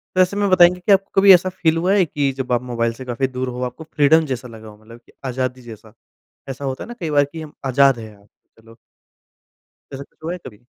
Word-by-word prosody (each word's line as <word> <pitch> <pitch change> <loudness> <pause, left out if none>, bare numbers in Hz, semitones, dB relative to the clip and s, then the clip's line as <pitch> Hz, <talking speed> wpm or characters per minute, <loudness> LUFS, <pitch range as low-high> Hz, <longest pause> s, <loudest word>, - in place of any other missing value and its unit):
तो 185 - +4
ऐसे 185 +2 +1
में 200 -1 +1
बताएँगे 180 -1 +5
कि 180 +3 -1
आपको 195 0 +2
कभी 195 -1 +9
ऐसा 185 +1 +3
फील 165 -3 0
हुआ 180 +4 +1
है 195 -4 +3
कि 145 -3 -1
जब 130 -1 -4
आप 120 - +1
मोबाइल 115 -2 -2
से 130 +2 -10
काफ़ी 125 +2 -2
दूर 130 0 -4
हो, 125 0 -6
आपको 125 +5 -6
फ्रीडम 155 +2 +4
जैसा 130 -3 -5
लगा 110 -2 -12
हो? 105 -1 -13
मतलब 115 +2 -15
कि - - -22
आज़ादी 130 0 -3
जैसा, 110 -2 -13 0.6
ऐसा 135 +1 -7
होता 130 -1 -4
है - - -13
ना 240 - -8
कई 165 -3 -3
बार 145 -1 +3
कि 165 - -7
हम 155 -1 -10
आज़ाद 135 -1 +3
हैं 110 -2 -10
आज, 100 0 -24 0.3
चलो 115 0 -18 1.2
ऐसा 135 - -6
कुछ - - -30
हुआ 165 - -3
है 180 - -5
कभी? 115 0 -13
135 Hz, 250 wpm, -20 LUFS, 120-170 Hz, 1.2 s, कभी